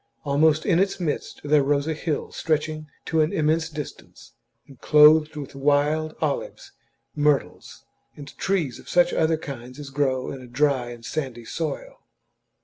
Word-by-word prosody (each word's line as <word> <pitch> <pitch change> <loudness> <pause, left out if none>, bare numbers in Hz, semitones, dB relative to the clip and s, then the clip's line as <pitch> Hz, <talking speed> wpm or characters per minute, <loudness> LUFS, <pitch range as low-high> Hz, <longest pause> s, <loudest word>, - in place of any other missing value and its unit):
Almost 150 +2 +3
in 175 -4 +3
its 195 0 0
midst 165 -5 -3
there 150 0 +4
rose 140 +1 +1
a 160 - -1
hill 155 0 -3
stretching 155 -1 -2 0.2
to 160 -1 +1
an 155 - +1
immense 160 +1 +1
distance, 150 -2 -9 0.3
and 135 -4 -17
clothed 150 +1 +6
with 145 -2 -7
wild 145 +3 +1
olives, - - -3 0.4
myrtles, 150 -2 -1 0.3
and 145 -1 -11
trees 170 -11 -1
of - - -14
such 175 0 +3
other 160 0 +2
kinds 125 -4 -8
as 140 -2 -8
grow 130 -2 0
in 135 - -7
a 125 - -11
dry 130 -1 +1
and 120 -1 -10
sandy 125 -6 -4
soil. 155 +3 -5
150 Hz, 155 wpm, -24 LUFS, 140-155 Hz, 0.4 s, clothed